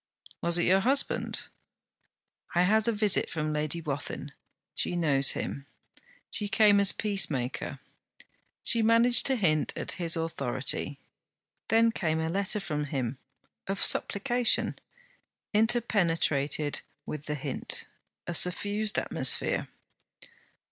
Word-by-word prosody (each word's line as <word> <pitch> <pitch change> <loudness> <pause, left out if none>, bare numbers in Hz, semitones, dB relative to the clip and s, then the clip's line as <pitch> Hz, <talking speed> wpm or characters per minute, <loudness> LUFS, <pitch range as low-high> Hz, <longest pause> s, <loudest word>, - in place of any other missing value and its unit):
'Was 170 0 +1
it 175 - +1
your 190 +2 +4
husband?' 270 +7 +1 1.1
'I 175 - +4
had 215 +4 +2
a - - +3
visit 210 -2 +2
from 155 -1 -3
Lady 150 +2 -2
Wathin. 145 -1 -5 0.4
She - - -1
knows 140 -6 +3
him. 140 0 -5 0.6
She 205 -1 -1
came 205 -1 +5
as 200 -1 +6
peacemaker. 140 - -3 0.9
She 230 - +4
managed 230 +1 +4
to 265 - +2
hint 155 -9 +1
at - - -3
his 170 -1 +2
authority. 140 -3 -2 0.7
Then 230 +1 +4
came 160 -7 -1
a 160 0 -2
letter 200 +3 +1
from 150 -7 -3
him 130 -3 -4 0.5
of 195 +1 -3
supplication, 240 +3 +1 0.8
interpenetrated 170 - +1 0.2
with 150 -1 -7
the 150 - -2
hint: 140 -2 -2 0.4
a 175 - -4
suffused 205 +5 +2
atmosphere. - - +1
175 Hz, 115 wpm, -28 LUFS, 150-210 Hz, 1.1 s, as